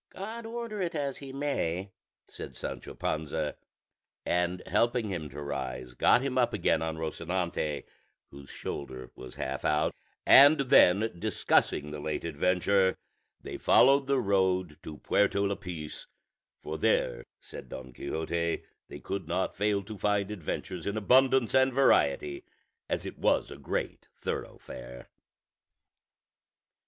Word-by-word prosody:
"God 225 Hz, +4 st, -7 dB
order 230 Hz, -3 st, -5 dB
it 175 Hz, -2 st, -2 dB
as 140 Hz, -3 st, -2 dB
he 140 Hz, -1 st, -8 dB
may," 100 Hz, -, -2 dB, 0.3 s
said -, -, -9 dB
Sancho -, -, -6 dB
Panza; 75 Hz, -1 st, -2 dB, 0.7 s
and 90 Hz, +1 st, 0 dB
helping 120 Hz, -2 st, +1 dB
him 80 Hz, -5 st, -4 dB
to 70 Hz, +2 st, -9 dB
rise, 65 Hz, -3 st, -5 dB
got 120 Hz, -, +4 dB
him 130 Hz, -2 st, 0 dB
up 120 Hz, -, +2 dB
again 80 Hz, -, +1 dB
on 80 Hz, 0 st, -3 dB
Rosinante, 80 Hz, -1 st, -2 dB, 0.5 s
whose 70 Hz, 0 st, -12 dB
shoulder 65 Hz, -2 st, -6 dB
was 65 Hz, -, -10 dB
half 65 Hz, 0 st, -4 dB
out; 75 Hz, -1 st, +1 dB, 0.3 s
and 145 Hz, +3 st, +8 dB
then, 110 Hz, -4 st, +5 dB
discussing 75 Hz, -3 st, +1 dB
the 75 Hz, -, -6 dB
late 75 Hz, +1 st, -3 dB
adventure, 90 Hz, +4 st, +2 dB, 0.4 s
they -, -, -6 dB
followed 135 Hz, 0 st, +5 dB
the 140 Hz, -1 st, +2 dB
road 95 Hz, -6 st, +1 dB
to 75 Hz, -1 st, -8 dB
Puerto 100 Hz, 0 st, +2 dB
Lapice, 90 Hz, -6 st, -5 dB, 0.6 s
for -, -, -5 dB
there, -, -, +1 dB, 0.2 s
said -, -, -11 dB
Don 65 Hz, -1 st, -8 dB
Quixote, 85 Hz, +5 st, -2 dB, 0.2 s
they -, -, -9 dB
could 95 Hz, -4 st, -5 dB
not 90 Hz, +3 st, -1 dB
fail 100 Hz, 0 st, +1 dB
to 105 Hz, 0 st, -9 dB
find 105 Hz, -1 st, +1 dB
adventures 90 Hz, -2 st, -5 dB
in 100 Hz, +2 st, -1 dB
abundance 130 Hz, +2 st, +4 dB
and 130 Hz, 0 st, +4 dB
variety, 75 Hz, -, +2 dB, 0.5 s
as -, -, -2 dB
it -, -, -7 dB
was -, -, +2 dB
a -, -, -7 dB
great -, -, -4 dB
thoroughfare. -, -, -6 dB
95 Hz, 135 wpm, -29 LUFS, 75-125 Hz, 0.7 s, and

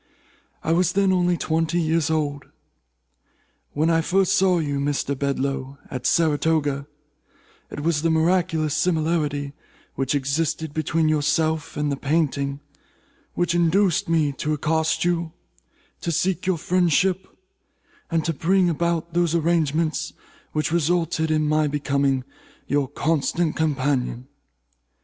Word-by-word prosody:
I 160 Hz, -, 0 dB
was 175 Hz, +1 st, +2 dB
then 195 Hz, -1 st, +3 dB
only 180 Hz, -1 st, +2 dB
twenty 165 Hz, +1 st, 0 dB
years 160 Hz, -1 st, +1 dB
old. 145 Hz, -3 st, -1 dB, 1.3 s
When 155 Hz, +3 st, +1 dB
I 165 Hz, 0 st, +3 dB
first 190 Hz, +3 st, +2 dB
saw 190 Hz, -2 st, +3 dB
you, 145 Hz, -4 st, -1 dB
Mr. 140 Hz, 0 st, -1 dB
Bedloe, 135 Hz, 0 st, -2 dB
at 130 Hz, -2 st, -2 dB
Saratoga, 150 Hz, -3 st, +1 dB, 0.8 s
it -, -, -6 dB
was 155 Hz, -1 st, +1 dB
the 165 Hz, -, +1 dB
miraculous 160 Hz, -2 st, +1 dB
similarity 155 Hz, -4 st, 0 dB, 0.4 s
which 135 Hz, +1 st, -1 dB
existed 145 Hz, +2 st, -1 dB
between 160 Hz, +1 st, 0 dB
yourself 155 Hz, +1 st, 0 dB
and 150 Hz, -1 st, 0 dB
the 140 Hz, -, -2 dB
painting 140 Hz, -1 st, -1 dB, 0.7 s
which 175 Hz, -1 st, 0 dB
induced 175 Hz, +1 st, +2 dB
me 160 Hz, -3 st, +2 dB
to 155 Hz, -, -1 dB
accost 160 Hz, +3 st, 0 dB
you, 170 Hz, -2 st, -1 dB, 0.7 s
to 170 Hz, -, -2 dB
seek 180 Hz, +2 st, -1 dB
your 185 Hz, -2 st, +2 dB
friendship, 185 Hz, +2 st, +1 dB, 0.8 s
and 165 Hz, -2 st, 0 dB
to 165 Hz, -, 0 dB
bring 180 Hz, +4 st, +2 dB
about 170 Hz, 0 st, -1 dB
those 170 Hz, -1 st, +1 dB
arrangements 165 Hz, 0 st, 0 dB, 0.4 s
which 155 Hz, 0 st, -1 dB
resulted 165 Hz, -1 st, +1 dB
in 155 Hz, -1 st, +1 dB
my 155 Hz, 0 st, +2 dB
becoming 140 Hz, -2 st, 0 dB, 0.4 s
your 140 Hz, -1 st, 0 dB
constant 160 Hz, +3 st, 0 dB
companion. 135 Hz, -5 st, -1 dB
160 Hz, 125 wpm, -23 LUFS, 145-170 Hz, 1.3 s, then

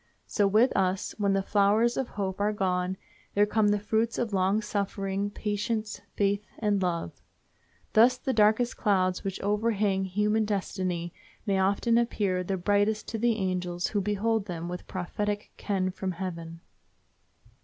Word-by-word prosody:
So 205 Hz, -2 st, +1 dB
with 220 Hz, +6 st, +3 dB
us, 190 Hz, 0 st, 0 dB
when 200 Hz, -1 st, +2 dB
the 195 Hz, 0 st, +1 dB
flowers 210 Hz, +4 st, +3 dB
of 265 Hz, -, -1 dB
hope 195 Hz, -3 st, -4 dB
are 210 Hz, +1 st, +2 dB
gone, 185 Hz, -2 st, -1 dB, 0.4 s
there 205 Hz, +1 st, +5 dB
come 210 Hz, 0 st, +2 dB
the 205 Hz, 0 st, +3 dB
fruits 220 Hz, +3 st, 0 dB
of 230 Hz, -4 st, -2 dB
long 190 Hz, +2 st, +2 dB
suffering, 200 Hz, -1 st, -2 dB
patience, 210 Hz, +1 st, -3 dB
faith, 200 Hz, 0 st, +1 dB
and 205 Hz, -3 st, +1 dB
love. 170 Hz, -, -2 dB, 0.7 s
Thus 240 Hz, +3 st, +6 dB
the 265 Hz, +1 st, -2 dB
darkest 220 Hz, +2 st, +3 dB
clouds 185 Hz, -4 st, +1 dB
which 195 Hz, -1 st, -3 dB
overhang 205 Hz, -2 st, +1 dB
human 210 Hz, +3 st, +1 dB
destiny 185 Hz, -4 st, -2 dB, 0.3 s
may 195 Hz, -3 st, +1 dB
often 200 Hz, +5 st, +3 dB
appear 200 Hz, -6 st, 0 dB
the 190 Hz, +1 st, -2 dB
brightest 205 Hz, +3 st, +1 dB
to 225 Hz, -, -3 dB
the 235 Hz, 0 st, +2 dB
angels 180 Hz, -3 st, -2 dB
who 205 Hz, -, 0 dB
behold 210 Hz, +2 st, 0 dB
them 170 Hz, -2 st, -4 dB
with 180 Hz, 0 st, -6 dB
prophetic 205 Hz, +3 st, -3 dB
ken 190 Hz, -3 st, -1 dB
from 185 Hz, 0 st, -4 dB
heaven. 165 Hz, -2 st, -6 dB
200 Hz, 155 wpm, -28 LUFS, 185-215 Hz, 0.7 s, Thus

